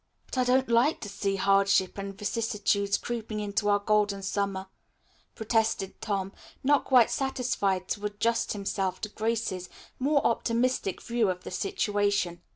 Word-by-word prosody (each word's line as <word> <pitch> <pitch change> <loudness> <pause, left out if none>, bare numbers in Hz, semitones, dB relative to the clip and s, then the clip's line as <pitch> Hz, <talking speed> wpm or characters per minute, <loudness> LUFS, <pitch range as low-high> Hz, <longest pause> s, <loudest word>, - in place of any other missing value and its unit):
"But - - -4
I - - +4
don't 260 +1 +3
like 235 +6 +3
to 205 - -5
see 200 0 -1
hardship 195 -1 +3
and 195 0 -6
vicissitudes 205 -2 0
creeping 225 -2 -4
into 205 0 -1
our 205 - +5
Golden 205 -1 +1
Summer," 195 -1 -2 0.7
protested 220 -3 0
Tom, 195 -2 -2 0.3
not 285 +1 +3
quite 250 -4 +5
satisfied 240 -8 -1
to 205 0 -2
adjust 230 +3 0
himself 195 -2 -2
to 210 - -3
Grace's 215 -4 -2 0.3
more 285 +2 +2
optimistic 235 -3 0
view 235 -3 +1
of 180 0 -3
the - - -7
situation. 205 - 0
205 Hz, 145 wpm, -28 LUFS, 195-235 Hz, 0.7 s, our